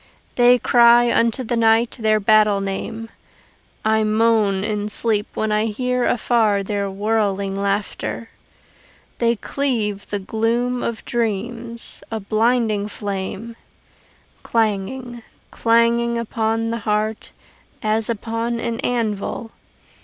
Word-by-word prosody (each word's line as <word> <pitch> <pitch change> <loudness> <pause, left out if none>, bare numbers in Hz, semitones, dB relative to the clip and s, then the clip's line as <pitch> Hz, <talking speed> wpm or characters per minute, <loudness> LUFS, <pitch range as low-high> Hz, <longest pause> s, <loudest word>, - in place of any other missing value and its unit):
They 245 0 +5
cry 240 0 +5
unto 230 +2 +1
the 240 0 -2
night 225 0 +3
their 215 -1 +2
battle 210 0 +4
name: 195 +3 -4 0.8
I 220 0 +3
moan 215 -3 +2
in 210 -1 -2
sleep 210 -1 0
when 220 0 -1
I 210 +1 +2
hear 250 +3 -1
afar 220 -4 +2
their 200 0 -2
whirling 200 -1 -1
laughter. 200 +3 -3 0.9
They 235 0 +2
cleave 220 -5 -2
the 205 - -1
gloom 230 +5 -1
of 230 -1 -4
dreams, 230 +1 -3
a 225 - -3
blinding 215 0 +1
flame, 205 +2 -5 0.9
Clanging, 230 +3 -1 0.3
clanging 235 +1 +2
upon 225 0 -1
the 230 - -2
heart 215 0 -2 0.5
as 215 +1 +1
upon 230 +1 -2
an 235 0 -3
anvil. 225 -1 -2
225 Hz, 110 wpm, -21 LUFS, 210-235 Hz, 0.9 s, They